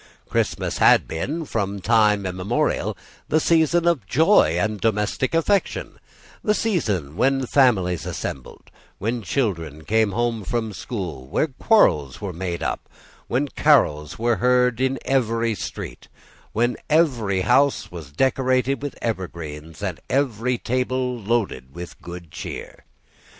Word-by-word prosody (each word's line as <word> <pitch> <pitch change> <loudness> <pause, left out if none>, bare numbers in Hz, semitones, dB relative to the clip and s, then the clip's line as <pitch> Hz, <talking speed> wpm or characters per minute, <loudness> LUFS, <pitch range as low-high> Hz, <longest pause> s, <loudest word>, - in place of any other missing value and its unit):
Christmas - - -1
had - - +5
been, 150 - -3
from 100 -6 -2
time 105 -1 +3
immemorial, 90 +1 -1 0.3
the 155 - +3
season 165 +1 +3
of 145 - +1
joy 150 - +4
and 105 +1 -1
domestic 110 +6 0
affection, 190 +4 0 0.4
the 210 - +2
season 105 - -1
when 135 +5 +2
families 105 - +2
assembled, 65 - -6 0.3
when 115 +4 -2
children 85 - -2
came 110 -2 +2
home 115 -1 -1
from 110 +1 -2
school, 90 - -5
when 145 - -1
quarrels 75 - +3
were 100 -3 -5
made 85 0 -4
up, - - -3 0.4
when 135 +4 0
carols 75 - +2
were 115 0 +1
heard 125 +2 +2
in 130 0 +1
every 115 -3 +1
street, 85 - -7 0.4
when 120 +2 0
every 125 - +2
house 130 +7 +2
was 80 -5 -9
decorated 130 - +1
with 145 -2 -5
evergreens, 80 -6 -5
and 95 -5 -3
every 125 -3 0
table 125 +1 -1
was 105 -4 -12
loaded 90 - -1
with 85 0 -9
good 85 -2 -9
cheer. - - -8
115 Hz, 130 wpm, -23 LUFS, 90-130 Hz, 0.4 s, had